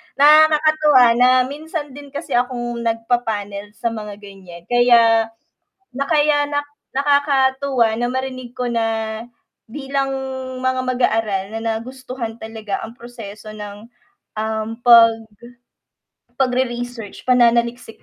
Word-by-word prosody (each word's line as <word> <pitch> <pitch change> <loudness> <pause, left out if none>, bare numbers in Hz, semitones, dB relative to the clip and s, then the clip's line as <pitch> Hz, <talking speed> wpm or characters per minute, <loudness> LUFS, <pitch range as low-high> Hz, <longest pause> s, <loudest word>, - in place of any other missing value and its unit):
Nakakatuwa 305 -2 +5
na 250 0 +6
minsan 295 +2 -6
din 285 +2 -11
kasi 295 -1 -6
akong 240 -1 -1
nagpapanel 225 -3 -2
sa 235 +1 -2
mga 210 -2 -7
ganyan, 185 -4 -12
kaya 230 -2 +5 0.7
na 275 +2 -1
kaya 295 -2 +3
nak 290 0 -2 0.2
nakakatuwa 270 -4 +2
na 240 +2 -1
marinig 255 -1 -5
ko 250 - -1
na 225 -2 -2 0.5
bilang 275 0 -2 0.5
mga 260 0 0
mag-aaral 225 -6 0
na 225 - -3 0.2
nagustuhan 255 -1 -7
talaga 220 -3 -6
ang 225 - -9
proseso 215 -3 -10
ng, 210 0 -9 0.5
um, 220 0 -2 0.2
pag 230 -1 +8 1.3
pagre-research 245 -4 -2
pananaliksik 235 -1 +2
240 Hz, 105 wpm, -19 LUFS, 225-265 Hz, 1.3 s, pag